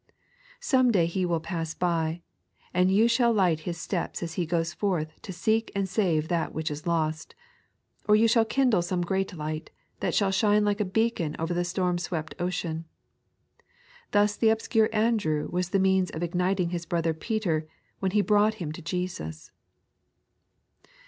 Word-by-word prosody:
Some 260 - +3
day 185 -7 +3
He 180 +2 -1
will 170 -1 +1
pass 165 0 -4
by, 170 -1 -1 0.5
and 180 +1 +3
you 215 +4 +5
shall 235 0 +3
light 185 -7 +2
His 170 - -4
steps 175 +1 -3
as 165 -1 -4
He 170 -1 -2
goes 165 0 -1
forth 165 -7 -2
to - - -7
seek 220 +5 0
and 195 -1 0
save 170 -6 +1
that 170 -1 -1
which 155 -1 -2
is 150 +3 -6
lost; 160 -2 -1 0.7
or 210 - +7
you 225 +2 +5
shall 230 0 +4
kindle 245 -4 +2
some 175 +1 -1
great 190 +2 -1
light, 155 0 -5 0.3
that - - -1
shall 200 -2 +2
shine 210 +1 +3
like 205 0 +1
a - - +1
beacon 190 -6 0
over 165 +2 -2
the 175 0 0
storm 180 0 0
swept 160 -3 -4
ocean. 170 -2 -2 1.2
Thus 205 0 +3
the 225 - +3
obscure 220 0 +2
Andrew 215 -9 +1
was 180 0 -1
the 195 - +2
means 190 -1 +3
of 160 - -5
igniting 180 +1 0
his 170 -1 -4
brother 165 -1 0
Peter, 160 -3 -1 0.3
when 190 - 0
he 210 - +4
brought 210 +1 +3
him 170 -8 -5
to 155 - -8
Jesus. 170 - -5
180 Hz, 170 wpm, -27 LUFS, 165-210 Hz, 1.2 s, or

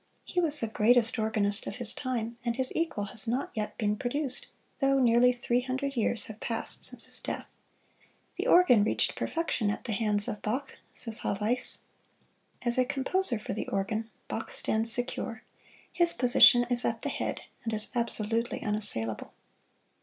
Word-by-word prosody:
He 360 - -2
was 305 -4 +3
the - - 0
greatest 230 +2 +3
organist 215 -1 0
of - - -4
his 240 -3 +1
time, 235 -3 -3
and 235 -1 -1
his 260 0 -1
equal 325 -11 -1
has 225 - -1
not 250 +5 -1
yet 215 -1 -4
been 210 -2 0
produced, 265 +2 -2 0.3
though 275 -1 +3
nearly 245 0 +5
three 245 0 0
hundred 265 +2 -3
years 225 -2 +1
have 220 0 -10
passed 230 -1 -5
since - - -3
his - - -9
death. - - -6 0.9
"The - - -2
organ 250 - +6
reached 215 - 0
perfection 325 -10 -1
at 205 - -3
the 235 - -4
hands 205 -1 +1
of 210 - -4
Bach," 260 +6 -3 0.2
says 225 -2 -2
Haweis. 215 +5 0 0.8
As 240 0 0
a 255 - +4
composer 275 +2 +1
for 210 - -5
the 215 - -4
organ, 215 +3 -2 0.2
Bach - - -5
stands 225 +1 +2
secure 230 -2 -1 0.5
his 345 -1 +3
position 245 0 +6
is 240 0 +2
at 230 -1 -1
the 285 - -2
head, - - -3 0.2
and 230 - -3
is 215 -1 -2
absolutely 230 -1 -1
unassailable. 205 - +2
235 Hz, 170 wpm, -29 LUFS, 215-255 Hz, 0.9 s, organ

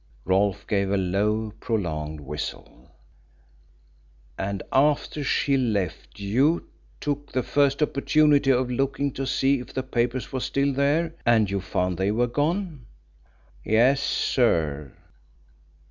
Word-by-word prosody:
"Whew!" 90 - -4
Rolfe 100 +1 +1
gave 100 -2 0
a 100 - +1
low 105 +3 0
prolonged 80 -8 -3
whistle. 75 +2 -7 1.5
"And 100 0 -3
after 145 +1 +2
she 140 0 +1
left 105 -10 -2
you 130 +12 +1 0.3
took 145 0 -3
the 130 - 0
first 140 +2 +2
opportunity 145 -1 +3
of 125 -1 +2
looking 135 +2 -1
to 135 0 -4
see 135 +1 +2
if 125 - -10
the 130 - -1
papers 125 0 -2
were 130 - -1
still 140 +2 0
there, 150 +5 +1
and 110 -4 +3
you 100 -1 -1
found 90 -1 -2
they 95 +1 +1
were 115 +4 +2
gone?" 150 - -2 0.8
"Yes, 125 +6 +3
sir." 80 - 0
120 Hz, 130 wpm, -25 LUFS, 100-140 Hz, 1.5 s, opportunity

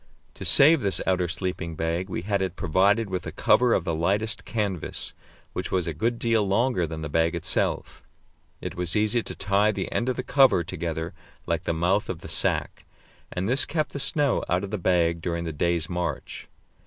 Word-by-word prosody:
To - - -9
save 150 +1 +6
this 100 -2 +1
outer 90 -2 +1
sleeping 85 -1 -3
bag, 85 +4 -2
we 85 - -4
had 100 0 0
it 95 -2 -2
provided 100 +7 +2
with 95 -2 -4
a - - -4
cover 125 -1 +3
of - - 0
the 85 - -2
lightest 100 +7 +1
canvas, 100 -7 -3 0.4
which - - -3
was 90 -2 +1
a 85 - -3
good 115 +10 -1
deal 115 -2 +2
longer 100 -2 +1
than 80 0 -6
the - - -3
bag 80 +3 +1
itself. 85 - -1 0.6
It - - -5
was 90 -1 -2
easy 110 +3 +2
to - - -8
tie 100 +2 +2
the - - -4
end 120 - 0
of 130 - 0
the 125 - -3
cover 130 -8 +4
together 85 -1 -4 0.3
like - - -2
the - - 0
mouth 90 +5 +1
of 80 - -4
the - - -9
sack, - - -1 0.5
and 90 +2 -2
this 130 +4 +3
kept 155 -1 -2
the 140 - -4
snow 145 -1 +1
out 90 +2 +1
of 100 - -5
the 105 - -2
bag 85 -2 +1
during 85 0 -2
the 80 -1 -4
day's 85 +1 0
march. 85 -5 -4
95 Hz, 205 wpm, -25 LUFS, 85-110 Hz, 0.6 s, save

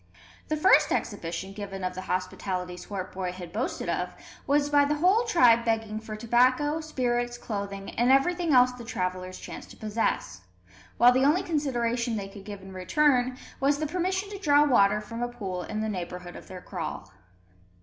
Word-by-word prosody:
The 310 - -1
first 375 +5 +5
exhibition 190 -2 -3
given 195 -2 -6
of 185 0 -2
the 185 - -6
hospitality 185 0 -3
Swartboy 185 -1 -5
had 180 -2 -9
boasted 235 +5 -2
of - - -2 0.3
was 290 +1 +3
by 290 0 +4
the 290 +1 +1
whole 375 +10 +3
tribe 245 - +5
begging 225 -2 -1
for 220 -1 -7
tobacco, 255 +7 +2
spirits, 245 -5 -1
clothing, 200 -3 -5
and 240 +2 +2
everything 340 +5 +3
else 250 -1 +6
the 250 -1 -10
travellers 185 -4 -3
chanced - - -9
to - - -13
possess; 210 - -2 0.6
while 245 +1 +7
the 260 +1 +2
only 300 +7 +3
consideration 240 -7 -1
they 195 -2 -4
could 195 0 -12
give 205 -2 -8
in 190 0 -10
return 255 +6 +2 0.2
was 280 +1 +2
the 310 - -2
permission 370 +5 -1
to 400 - -6
draw 295 -5 +5
water 210 -6 +4
from 230 +2 -7
a 240 - 0
pool 195 -7 -5
in 215 +4 -4
the 220 - -1
neighbourhood 180 -3 -5
of - - -11
their 185 -1 -9
kraal. - - -5
235 Hz, 180 wpm, -27 LUFS, 195-285 Hz, 0.6 s, while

